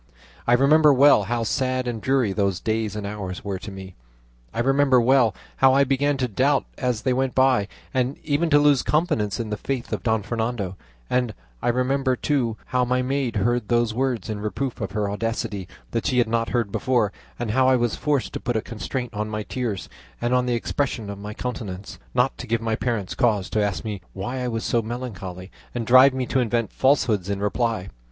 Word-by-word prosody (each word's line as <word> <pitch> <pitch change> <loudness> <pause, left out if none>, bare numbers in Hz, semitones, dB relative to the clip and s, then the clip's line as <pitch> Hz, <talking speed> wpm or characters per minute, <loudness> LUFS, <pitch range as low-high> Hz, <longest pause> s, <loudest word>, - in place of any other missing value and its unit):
I 120 - +5
remember 150 +4 +6
well 135 -6 +6
how 120 +2 -1
sad 130 +2 0
and 115 -3 -3
dreary 130 -7 +1
those 100 -3 0
days 110 0 -1
and 105 -1 -4
hours 100 -3 -5
were 100 -2 -3
to 105 - -8
me; 95 -1 -9 0.6
I - - -5
remember 135 +1 +4
well 120 -3 +4 0.2
how 135 0 +5
I 140 - +5
began 140 +1 +1
to 130 -1 0
doubt 135 +5 +2
as 125 -3 -1
they 130 - +2
went 130 0 0
by, 130 -6 +3 0.3
and 130 +1 0
even 155 +3 +1
to 145 - +6
lose 145 -2 +4
confidence 150 - 0
in 110 -2 -3
the 105 - -1
faith 130 -1 -3
of - - -2
Don 110 -3 +1
Fernando; 110 -3 -2 0.3
and 125 -4 0 0.3
I - - -2
remember, 130 +2 +1
too, 125 -6 0
how 125 -1 +1
my 125 +1 +1
maid 135 -2 -1
heard 120 +2 +1
those 120 -1 +2
words 130 -1 -1
in 110 -2 -3
reproof 115 +4 -3
of 100 -1 -4
her 105 -1 0
audacity 105 -2 -3 0.2
that 115 - -1
she 130 -3 +1
had 120 - +4
not 115 0 0
heard 115 -5 0
before, 120 -5 +1 0.3
and 120 -3 -2
how 130 +3 +3
I 130 - +5
was 120 -2 +1
forced 140 -9 -1
to - - -3
put 120 -1 -1
a - - 0
constraint 120 +2 -5
on 105 +1 -3
my 105 0 -3
tears 115 -4 -3 0.3
and 120 +1 0
on 125 0 +2
the 120 - +1
expression 115 -3 -2
of 100 - -8
my 105 +1 -7
countenance, 105 -6 -6 0.2
not 125 +1 +2
to - - -6
give 115 +1 +1
my 115 0 -1
parents 110 -5 -2
cause 110 -7 +1
to 110 - +1
ask 105 +1 -1
me 105 -3 -4
why 120 +7 -4
I 125 - -2
was 115 -2 -2
so 120 - +1
melancholy, 100 -6 -6 0.2
and 120 -2 -2
drive 130 +3 +7
me 130 -1 -1
to 130 - 0
invent 115 -3 0
falsehoods 115 -8 +2
in 100 -1 -1
reply. 105 -2 -1
120 Hz, 210 wpm, -24 LUFS, 105-130 Hz, 0.6 s, drive